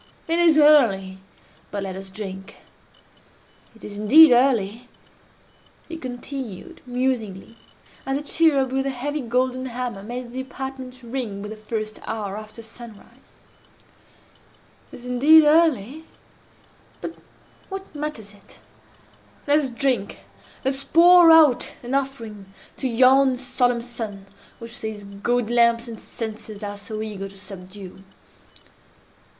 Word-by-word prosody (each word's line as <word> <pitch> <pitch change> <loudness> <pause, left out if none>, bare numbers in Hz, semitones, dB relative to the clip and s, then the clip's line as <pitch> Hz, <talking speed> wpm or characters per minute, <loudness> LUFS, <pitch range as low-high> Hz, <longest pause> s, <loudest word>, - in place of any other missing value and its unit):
It 330 +1 +1
is 335 -3 +5
early—but 200 -8 +1
let 190 -1 -5
us 190 0 -8
drink. 190 -1 -8 1.2
It 225 - -19
is 205 0 -7
indeed 290 +8 +8
early," 240 -2 +2 1.0
he 330 - -7
continued, 255 - -7
musingly, 240 -5 -3 0.5
as 270 0 -1
a 290 - -5
cherub 285 -4 +2
with 270 +1 -1
a - - 0
heavy 285 +3 -3
golden 255 +1 -1
hammer 245 -4 -5
made 240 +3 -7
the 260 +1 -4
apartment 260 -1 -8
ring 230 -5 -5
with 210 - -7
the - - -6
first 215 0 -5
hour 205 -3 -4
after 215 +2 -10
sunrise: 225 -1 -14 1.6
"It - - -11
is - - -13
indeed 285 +6 +6
early—but 305 -2 -2 0.6
what 385 -3 -8
matters 290 -9 -6
it? 205 - -19 0.9
let 290 +1 +4
us 280 -3 -2
drink! 245 -5 -1 0.4
Let 265 - +2
us 270 +1 -5
pour 345 +3 +7
out 310 -6 +5
an 245 +2 -5
offering 230 -8 -4 0.3
to 265 - -2
yon 260 +2 +4
solemn 245 -2 0
sun 225 -5 -6 0.3
which 230 +1 -10
these 220 -2 -6
gaudy 220 +4 -2
lamps 235 0 +3
and 225 -2 -8
censers 220 -2 -7
are 205 0 -5
so 215 +1 -6
eager 200 -2 -6
to 195 - -15
subdue!" 190 -1 -11
245 Hz, 125 wpm, -23 LUFS, 210-270 Hz, 1.6 s, indeed